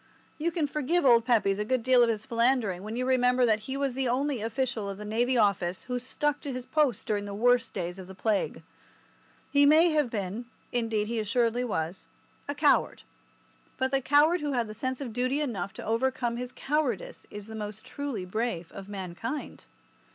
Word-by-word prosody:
You 335 +3 0
can 325 -2 0
forgive 300 +3 0
old 235 -3 +6
Pepys 210 -5 +2
a - - +1
good 250 +2 0
deal 255 0 +5
of 235 - +5
his 220 0 -2
philandering 230 -6 +1
when 215 +3 -5
you 250 +1 -1
remember 250 -1 +3
that 215 -2 +3
he 265 - -2
was 275 -2 0
the 265 0 0
only 260 0 0
official 225 -1 -2
of 195 - -5
the 210 - -7
Navy 240 +4 +1
Office 190 -4 +1
who 250 -1 -3
stuck 290 +4 -1
to 285 - -4
his 255 -1 -5
post 290 -8 +1
during 205 -1 -1
the 200 0 -6
worst 245 +2 +3
days 175 +2 -4
of 185 - -9
the 190 - -10
Plague. 210 +1 -1 0.9
He 285 0 +5
may 320 +3 +6
have 300 -5 +2
been—indeed, 225 +1 -3
he 230 0 -1
assuredly 230 +3 +1
was—a 190 - -5
coward, 290 0 +2 0.7
but 260 0 0
the 270 0 +2
coward 295 +6 +4
who 290 -1 -1
has 230 -4 -1
sense 260 +4 -3
of 245 -5 -5
duty 255 +4 0
enough 235 -9 -2
to - - -8
overcome 240 +1 0
his 250 0 -5
cowardice 305 - -2
is 205 -1 -8
the 220 - -10
most 210 +2 -6
truly 255 -7 -4
brave 185 -3 -3
of 195 0 -9
mankind. 200 - -5
245 Hz, 190 wpm, -28 LUFS, 210-270 Hz, 0.9 s, old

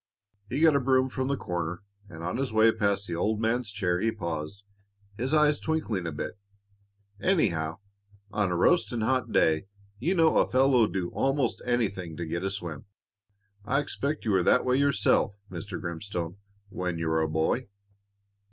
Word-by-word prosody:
He 145 - -1
got 160 -3 +6
a - - +4
broom 130 0 +2
from 130 0 -2
the 140 0 0
corner, 90 -1 -4 0.3
and 80 0 -9
on 90 - -2
his 135 -2 -2
way 110 +1 +5
past 100 -2 0
the 85 - -4
old 105 +5 0
man's 115 +1 0
chair 90 -4 0
he 115 +3 +1
paused, 85 -1 -5 0.5
his 125 +6 -2
eyes 150 -1 +4
twinkling 115 - -2
a - - -2
bit. 90 +7 -5 0.8
"Anyhow, 85 - +1 0.5
on 105 -3 0
a - - 0
roasting 120 - +2
hot 115 0 0
day 80 +3 +2 0.3
you 180 +4 +1
know 165 -2 +4
a - - +3
fellow'll 130 -3 +4
do 90 -4 -3
'most 135 -2 0
anything 100 -9 -1
to 85 - -3
get 85 +1 -3
a 95 - 0
swim. 90 -4 -6 0.8
I 130 +6 +1
expect 145 0 -3
you 110 - +1
were 95 -2 +3
that - - +3
way 125 0 +2
yourself, 135 -7 +2 0.2
Mr. 100 -3 -6
Grimstone, 85 0 -5 0.3
when 90 -4 -3
you 85 0 -2
were 80 0 +2
a 80 - 0
boy." 80 +11 0
105 Hz, 175 wpm, -28 LUFS, 85-130 Hz, 0.8 s, got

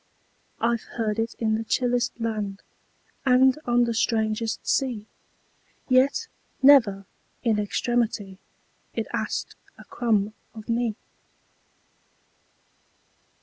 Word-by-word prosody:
I 235 +1 +2
've - - -18
heard 220 -1 -1
it 225 0 -2
in 220 -2 0
the 220 +1 -1
chillest 245 +1 0
land, 210 -4 -3 0.6
And 260 +1 +4
on 240 0 +3
the 235 -1 0
strangest 220 -1 0
sea; 245 -6 0 0.8
Yet, 270 - +3 0.4
never, 225 -9 +6 0.4
in 225 -3 +2
extremity, 210 -2 -1 0.6
It - - -1
asked - - -3 0.2
a - - -12
crumb 215 -3 0 0.2
of 215 -1 -10
me. 230 -2 0
230 Hz, 105 wpm, -25 LUFS, 215-245 Hz, 0.8 s, never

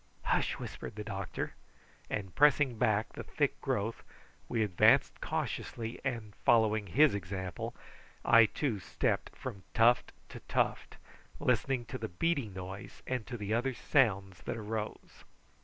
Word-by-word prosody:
"Hush!" - - +1
whispered - - -7
the 105 - -5
doctor; 100 -3 -4 0.6
and 95 -3 -3
pressing 140 -4 +4
back 110 -3 +2
the - - -6
thick - - -1
growth 110 +3 -1 0.5
we 115 -2 +1
advanced 95 -5 +4
cautiously, 115 0 -3
and 115 -6 -3
following 110 -3 +4
his 145 - +5
example 95 -2 -4 0.5
I, 115 -1 +7
too, 120 -3 -1
stepped 95 - -1
from 95 - -6
tuft 120 +1 +4 0.2
to - - -8
tuft, - - 0 0.4
listening 125 0 +1
to - - -6
the 110 -1 -4
beating 140 - 0
noise 95 +1 -8
and 125 -4 -3
to 120 - -5
the 105 0 -2
other 125 +3 0
sounds 95 - +2
that - - -3
arose. 110 0 -5
110 Hz, 140 wpm, -32 LUFS, 100-120 Hz, 0.6 s, I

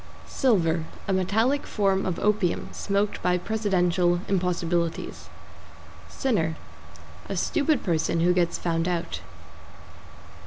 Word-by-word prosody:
=SILVER= 170 -10 +1 0.2
A 195 - +1
metallic 220 +9 +1
form 195 -2 +1
of 185 - -1
opium, 205 -4 0
smoked 200 +1 -1
by 180 0 +2
Presidential 180 -4 +1
impossibilities. 175 -3 -1 0.8
=SINNER= 165 -12 0 0.7
A - - -2
stupid 300 -3 +1
person 165 -2 +1
who 175 +1 +4
gets 175 -2 +1
found 165 0 -1
out. 175 -2 -2
180 Hz, 105 wpm, -26 LUFS, 170-205 Hz, 0.8 s, who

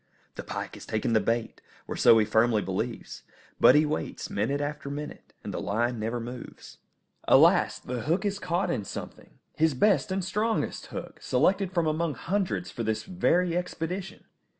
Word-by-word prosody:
The - - -6
pike - - -5
has - - -10
taken 110 +1 -1
the 110 - +5
bait, 115 +1 -2 0.3
or - - -4
so 115 - +6
he 110 - +4
firmly 110 0 +3
believes; 95 +1 -4 0.4
but 130 - +7
he 150 +1 +5
waits 80 - -4
minute 115 +8 0
after 145 -1 -4
minute, 145 +1 -7
and - - -5
the - - -3
line 120 +3 -1
never 115 +3 -2
moves. 120 +2 -9 0.5
Alas! - - +5
the 125 -1 -5
hook 170 - 0
is 200 0 -1
caught 180 0 -1
in 110 - -1
something! - - -9 0.2
His 160 -3 +3
best 195 +6 +3
and 190 -1 -1
strongest 215 +4 -1
hook, - - -8
selected 195 -1 +2
from 170 -3 +1
among 155 -1 0
hundreds 115 - -2
for - - -6
this 110 -1 -1
very 180 -1 +1
expedition! 180 +1 -4
150 Hz, 175 wpm, -27 LUFS, 115-180 Hz, 0.5 s, but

